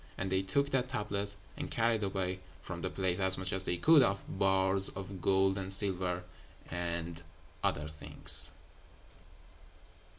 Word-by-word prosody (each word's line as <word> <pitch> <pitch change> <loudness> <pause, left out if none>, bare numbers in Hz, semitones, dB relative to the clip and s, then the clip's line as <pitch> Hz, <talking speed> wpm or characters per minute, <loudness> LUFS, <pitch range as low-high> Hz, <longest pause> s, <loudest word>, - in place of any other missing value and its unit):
And 95 0 -3
they 95 0 +2
took 140 +9 -1
that 130 -1 0
tablet, 100 -4 -3 0.2
and - - -6
carried 115 -1 0
away 95 -2 -2 0.2
from - - -7
the - - -2
place 95 -2 -2
as 95 -1 +2
much 95 -1 -3
as 95 -1 +2
they 90 - 0
could 155 - +6
of 100 -5 +1 0.2
bars 95 0 +3
of 95 -1 -8
gold 95 +1 +2
and 95 0 -4
silver 90 -2 +2 0.5
and 85 -1 -4 0.4
other 75 +1 -1
things.'" 75 -1 +4
95 Hz, 145 wpm, -32 LUFS, 90-100 Hz, 0.5 s, could